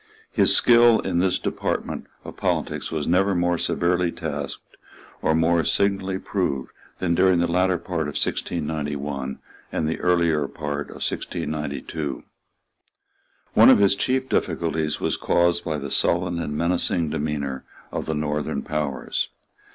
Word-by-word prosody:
His -, -, +4 dB
skill 120 Hz, -1 st, +6 dB
in 90 Hz, -3 st, -1 dB
this 90 Hz, 0 st, +2 dB
department -, -, -3 dB, 0.2 s
of -, -, -8 dB
politics -, -, -2 dB
was 80 Hz, -3 st, -2 dB
never 95 Hz, +3 st, +2 dB
more 85 Hz, -1 st, +1 dB
severely 90 Hz, 0 st, +1 dB
tasked 75 Hz, -5 st, -4 dB, 0.5 s
or 80 Hz, -, +2 dB
more 80 Hz, +1 st, +3 dB
signally 95 Hz, 0 st, +1 dB
proved 95 Hz, -9 st, -2 dB, 0.3 s
than 85 Hz, -2 st, 0 dB
during 90 Hz, +1 st, +4 dB
the 85 Hz, -, +2 dB
latter 90 Hz, +1 st, +2 dB
part 80 Hz, -3 st, -3 dB
of 75 Hz, -, -4 dB
1691 75 Hz, -4 st, -2 dB, 0.3 s
and 80 Hz, -, -1 dB
the 80 Hz, -, -2 dB
earlier 85 Hz, -5 st, +2 dB
part 75 Hz, -1 st, -4 dB
of -, -, -7 dB
1692. 75 Hz, -2 st, -4 dB, 1.3 s
One -, -, +8 dB
of -, -, +8 dB
his 100 Hz, -1 st, +4 dB
chief 130 Hz, +6 st, 0 dB
difficulties 80 Hz, -, -1 dB
was -, -, -1 dB
caused 85 Hz, 0 st, +2 dB
by 80 Hz, -3 st, -2 dB
the 70 Hz, -1 st, -5 dB
sullen 85 Hz, 0 st, +1 dB
and 75 Hz, -2 st, -3 dB
menacing 85 Hz, -1 st, +1 dB
demeanour 70 Hz, -3 st, -2 dB, 0.3 s
of -, -, -4 dB
the 80 Hz, -, -1 dB
Northern 75 Hz, 0 st, -2 dB
powers. 75 Hz, -3 st, -2 dB
85 Hz, 140 wpm, -24 LUFS, 75-90 Hz, 1.3 s, One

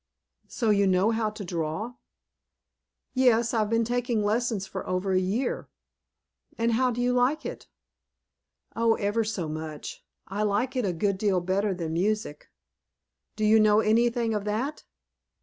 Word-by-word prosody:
"So 225 Hz, -4 st, 0 dB
you 200 Hz, -1 st, +3 dB
know 190 Hz, +4 st, +3 dB
how 220 Hz, -1 st, 0 dB
to 215 Hz, -1 st, -8 dB
draw?" 170 Hz, +7 st, -3 dB, 1.2 s
"Yes, 240 Hz, -3 st, +3 dB
I've 215 Hz, -2 st, +1 dB
been 230 Hz, +1 st, +2 dB
taking 240 Hz, -2 st, 0 dB
lessons 220 Hz, -1 st, 0 dB
for 190 Hz, 0 st, -6 dB
over 185 Hz, +1 st, -1 dB
a 185 Hz, -, +3 dB
year." 205 Hz, +8 st, -2 dB, 0.9 s
"And 230 Hz, +1 st, +1 dB
how 255 Hz, +3 st, +2 dB
do 245 Hz, 0 st, -3 dB
you 245 Hz, 0 st, +2 dB
like 250 Hz, +5 st, +1 dB
it?" -, -, -6 dB, 1.1 s
"Oh, 230 Hz, 0 st, +3 dB
ever 205 Hz, +2 st, 0 dB
so 210 Hz, -6 st, -3 dB
much! 155 Hz, -1 st, -6 dB, 0.2 s
I 200 Hz, +2 st, -3 dB
like 215 Hz, +6 st, 0 dB
it 250 Hz, -4 st, 0 dB
a 190 Hz, -, +1 dB
good 195 Hz, +2 st, 0 dB
deal 200 Hz, -3 st, +2 dB
better 190 Hz, +3 st, 0 dB
than 165 Hz, -3 st, -4 dB
music." 195 Hz, -3 st, -2 dB, 0.9 s
"Do 215 Hz, -, -1 dB
you 220 Hz, +1 st, +6 dB
know 215 Hz, 0 st, +5 dB
anything 230 Hz, +1 st, +2 dB
of 210 Hz, -1 st, -1 dB
that?" 240 Hz, +9 st, -3 dB
215 Hz, 155 wpm, -27 LUFS, 195-235 Hz, 1.2 s, you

